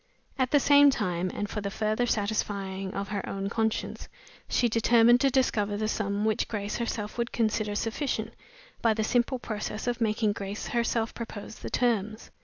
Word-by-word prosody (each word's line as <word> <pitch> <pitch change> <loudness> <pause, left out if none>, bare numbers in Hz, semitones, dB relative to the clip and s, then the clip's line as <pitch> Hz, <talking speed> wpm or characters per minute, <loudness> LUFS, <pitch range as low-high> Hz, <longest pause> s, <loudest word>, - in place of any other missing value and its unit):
At 255 -1 +2
the 290 - +5
same 285 +1 +7
time, 185 -8 -1
and 205 - -3
for 210 - -4
the 200 - -3
further 215 +4 0
satisfying 200 -3 -1
of 200 0 -3
her 200 -1 -2
own 195 0 -3
conscience, 220 0 -2 0.4
she 245 - +3
determined 235 +2 +5
to 275 - +4
discover 210 -6 +1
the 215 +1 -1
sum 205 -1 -1
which 220 -1 +1
Grace 205 -2 -3
herself 225 -1 -3
would 235 0 -1
consider 215 -2 0
sufficient 225 0 -2 0.5
by 225 -2 +3
the 220 - 0
simple 245 +3 +1
process 215 -2 -4
of 245 -1 -2
making 215 -1 +2
Grace 200 +1 -5
herself 235 -1 0
propose 220 -2 -7
the - - -6
terms. 220 -3 0
220 Hz, 175 wpm, -28 LUFS, 205-235 Hz, 0.5 s, same